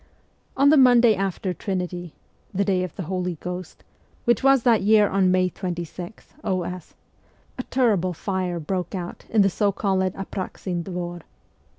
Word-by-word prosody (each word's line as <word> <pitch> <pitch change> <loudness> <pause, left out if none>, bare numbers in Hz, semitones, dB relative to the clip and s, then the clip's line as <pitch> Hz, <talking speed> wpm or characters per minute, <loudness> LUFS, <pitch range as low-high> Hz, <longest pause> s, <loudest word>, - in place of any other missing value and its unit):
On 280 +1 +5
the 305 - +6
Monday 245 -3 +6
after 190 -1 -2
Trinity 180 -2 -4 0.4
the 200 0 0
day 185 -2 +1
of 180 - -6
the 195 - -4
Holy 180 +1 -2
Ghost, 180 +2 -7 0.4
which 240 -3 +3
was 270 -2 +5
that 235 -3 +4
year 210 +1 +5
on 190 -1 +2
May 185 0 +3
26, 180 +1 -6
o.s. 180 -2 -3 0.6
a - - -1
terrible 210 -9 +2
fire 185 -1 -2
broke 180 +3 -3
out 175 -2 -6
in 215 -3 +4
the - - +4
so 205 +2 +1
called 195 -1 0
Apraxin 185 -2 -4
Dvor. 175 -1 -5
185 Hz, 155 wpm, -24 LUFS, 180-205 Hz, 0.6 s, the